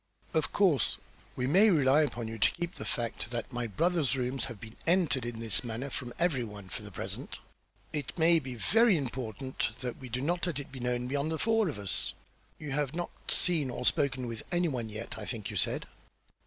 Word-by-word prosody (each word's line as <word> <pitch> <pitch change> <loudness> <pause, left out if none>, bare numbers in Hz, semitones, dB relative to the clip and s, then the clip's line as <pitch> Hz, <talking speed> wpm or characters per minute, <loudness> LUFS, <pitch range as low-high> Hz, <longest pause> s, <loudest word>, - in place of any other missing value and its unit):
"Of 160 - +1
course 175 - +3 0.4
we 125 - 0
may 195 +11 +6
rely 145 -4 +5
upon 120 -6 -1
you 115 0 -5
to 95 - +6
keep 175 0 -3
the - - -7
fact 120 -1 -2
that 120 -1 -4
my 120 -1 -1
brother's 155 - +2
rooms 130 +1 -1
have 120 -6 -7
been 110 +1 -10
entered 165 -8 +3
in 120 -1 -5
this 115 0 0
manner 120 +4 -4
from 125 -2 -4
every 165 -8 +2
one, 105 -4 -8
for - - -5
the 105 - -8
present. 95 - -5 0.6
It 150 +1 -3
may 165 0 +6
be 130 -4 -6
very 220 - +4
important 125 -2 -3
that 125 -2 -3
we 130 - -9
do 125 +2 -2
not 175 +5 0
let 170 - -1
it 140 - -8
be 130 - -7
known 125 0 -1
beyond 140 +3 0
the 160 - -1
four 225 0 +3
of 145 - -4
us. 100 -2 -1 0.4
You 150 -2 -6
have 145 +1 0
not 175 0 -2 0.2
seen 160 -7 +2
or - - -4
spoken 135 -4 +2
with 115 -1 -4
any 175 0 +3
one 125 -7 -2
as - - -9
yet, 110 +2 -5
I - - -5
think 110 -5 -3
you - - -6
said?" - - +1
130 Hz, 220 wpm, -31 LUFS, 120-160 Hz, 0.6 s, may